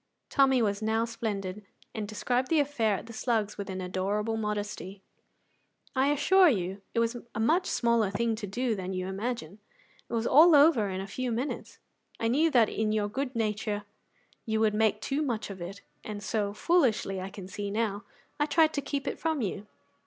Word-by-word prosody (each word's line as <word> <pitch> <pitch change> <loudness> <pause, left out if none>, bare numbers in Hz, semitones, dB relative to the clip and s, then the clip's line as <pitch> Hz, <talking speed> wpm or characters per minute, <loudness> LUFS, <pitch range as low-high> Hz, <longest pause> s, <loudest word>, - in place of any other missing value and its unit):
Tommy 265 -3 +4
was 205 -1 0
now 220 +1 +1
splendid, 210 -4 -4 0.3
and 215 -2 -4
described 245 +4 -1
the 320 +1 +3
affair 255 -8 +1
at - - -6
the 230 - -10
Slugs 220 -2 -1
with 200 - -5
an 190 0 -4
adorable 200 +4 -1
modesty. 205 -2 -4 0.9
"I 265 +1 +3
assure 360 +6 +5
you, 190 -4 -2
it - - +3
was 230 +1 0 0.2
a - - -2
much 330 +11 +2
smaller 235 -4 +2
thing 230 +3 0
to 210 -2 -5
do 240 +4 -1
than 190 -1 -4
you 185 0 -2
imagine; 195 -2 -4 0.5
it - - -7
was 230 0 0
all 315 +5 +7
over 280 -8 +5
in 190 0 -3
a - - -5
few 245 +5 -3
minutes; 245 +5 -4 0.4
I 225 - +1
knew 305 +7 +3
that 240 -7 +5
in 215 0 -1
your 210 -1 0
good 265 +3 -3
nature 210 -2 -1 0.6
you 220 -1 -1
would 220 -1 +3
make 215 0 +2
too 275 +6 -1
much 225 -8 -2
of 190 -2 -9
it, 190 +4 -7 0.2
and 205 -1 -6
so 205 0 -1
foolishly, 215 - +1
I 190 - -5
can 195 -2 -9
see 205 +1 -5
now 205 -1 -1 0.4
I 295 - +2
tried 315 +1 +4
to 285 - -1
keep 280 0 -3
it - - -3
from 320 -5 0
you. 205 +1 -4
220 Hz, 195 wpm, -29 LUFS, 205-255 Hz, 0.9 s, all